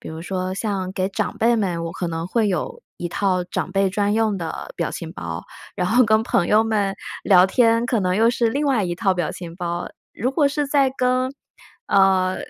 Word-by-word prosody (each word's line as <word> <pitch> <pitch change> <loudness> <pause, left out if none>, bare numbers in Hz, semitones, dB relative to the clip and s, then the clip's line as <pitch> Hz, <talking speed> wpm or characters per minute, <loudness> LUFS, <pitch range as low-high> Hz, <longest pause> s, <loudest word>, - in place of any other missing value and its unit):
比 - - -9
如 160 +1 -7
说 185 0 -3
像 195 -3 -3
给 190 0 -1
长 195 - -3
辈 235 +1 +3
们， 180 -6 -1
我 165 - -4
可 175 - -4
能 165 0 -3
会 225 +2 +1
有 185 -6 -2 0.2
一 175 - -3
套 185 0 0
长 180 +1 -4
辈 195 -1 +2
专 205 +1 0
用 220 -3 +1
的 170 - -6
表 - - -1
情 - - -6
包。 - - -6 0.3
然 - - -1
后 245 +3 +5
跟 220 +1 +3
朋 175 -6 +1
友 215 +3 +4
们 210 -3 0 0.3
聊 185 -3 +6
天， 230 +2 +3
可 240 -2 0
能 185 -2 0
又 225 +4 +4
是 235 -1 +1
另 280 +6 -1
外 255 -8 +2
一 175 - -2
套 195 +1 +1
表 175 -3 -2
情 170 -2 -8
包。 175 -1 -3 0.2
如 245 +6 -1
果 285 +1 +2
是 285 0 -1
在 280 -2 +3
跟， 255 +1 +1 0.5
呃， 190 -1 +3
200 Hz, 230 characters per minute, -22 LUFS, 185-230 Hz, 0.5 s, 聊